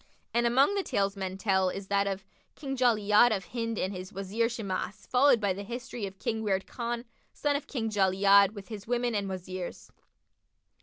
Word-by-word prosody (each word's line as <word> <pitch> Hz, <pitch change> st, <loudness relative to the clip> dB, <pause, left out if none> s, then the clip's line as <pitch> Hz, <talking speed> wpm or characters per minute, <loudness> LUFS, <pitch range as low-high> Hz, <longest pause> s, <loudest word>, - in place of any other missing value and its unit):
"[FN#54] -, -, -32 dB, 0.3 s
And 235 Hz, 0 st, +3 dB
among 270 Hz, +10 st, +4 dB
the 400 Hz, -, +1 dB
tales 200 Hz, -, 0 dB
men 190 Hz, -1 st, -4 dB
tell 190 Hz, -2 st, +2 dB
is 195 Hz, +2 st, -5 dB
that 200 Hz, 0 st, +2 dB
of 195 Hz, -1 st, -3 dB, 0.3 s
KING 270 Hz, -2 st, -4 dB
JALI'AD 230 Hz, -2 st, +4 dB
OF 195 Hz, -4 st, -1 dB
HIND 230 Hz, +3 st, -3 dB
AND 190 Hz, +2 st, -1 dB
HIS 185 Hz, 0 st, -7 dB
WAZIR 200 Hz, +4 st, -1 dB
SHIMAS; 205 Hz, -3 st, -4 dB
FOLLOWED 255 Hz, -1 st, +4 dB
BY 200 Hz, -3 st, +1 dB
THE 195 Hz, -, -6 dB
HISTORY 240 Hz, -1 st, -5 dB
OF 190 Hz, 0 st, -11 dB
KING 220 Hz, +3 st, -2 dB
WIRD 195 Hz, -3 st, 0 dB
KHAN, 235 Hz, 0 st, -4 dB, 0.3 s
SON 290 Hz, -1 st, 0 dB
OF 285 Hz, -, -3 dB
KING 225 Hz, -5 st, -3 dB
JALI'AD, 200 Hz, +1 st, +4 dB
WITH 200 Hz, +1 st, -9 dB
HIS 210 Hz, -2 st, -8 dB
WOMEN 240 Hz, 0 st, 0 dB
AND 200 Hz, -2 st, -1 dB
WAZIRS. 185 Hz, -1 st, -6 dB
205 Hz, 195 wpm, -29 LUFS, 195-240 Hz, 0.3 s, among